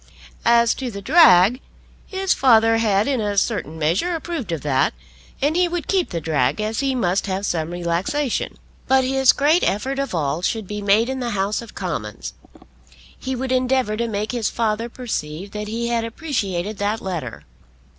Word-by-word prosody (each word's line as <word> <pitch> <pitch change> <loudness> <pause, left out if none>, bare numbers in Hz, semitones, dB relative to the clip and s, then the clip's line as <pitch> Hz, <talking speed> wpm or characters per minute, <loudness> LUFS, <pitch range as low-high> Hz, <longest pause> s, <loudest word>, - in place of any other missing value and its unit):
As 235 -1 +5
to 260 -2 -5
the 200 -3 -7
drag, 240 - +6 0.5
his 385 -1 0
father 225 -3 +4
had 210 -2 +2
in 265 -5 0
a 205 -1 -2
certain 195 -7 -1
measure 175 - 0
approved 325 - -4
of 165 -4 -2
that, 140 0 +1 0.5
and 295 +3 +2
he 360 0 +3
would 345 -1 -4
keep 375 -3 +1
the 170 - -3
drag, 150 -3 0
as 215 +1 -2
he 270 -1 0
must 195 -5 0
have 195 +1 -2
some 165 -4 -1
relaxation. 175 +11 -2 0.3
But 265 0 +4
his 265 0 +4
great 305 +5 +2
effort 265 +7 -1
of 275 -8 -2
all 150 0 -1
should 220 +3 -1
be 210 +2 -5
made 205 +3 +3
in 265 0 -3
the 245 -2 -2
House 200 +4 0
of 230 - -12
Commons. 105 - -5 0.8
He 260 0 -4
would 255 +1 -3
endeavour 255 -3 +1
to 235 +2 -1
make 210 -1 -2
his 240 -4 -1
father 225 +1 -1
perceive 195 -7 -5
that 210 0 -5
he 235 +2 -2
had 235 -1 0
appreciated 215 - -3
that 205 +2 0
letter. 180 -5 -5
220 Hz, 180 wpm, -21 LUFS, 185-260 Hz, 0.8 s, drag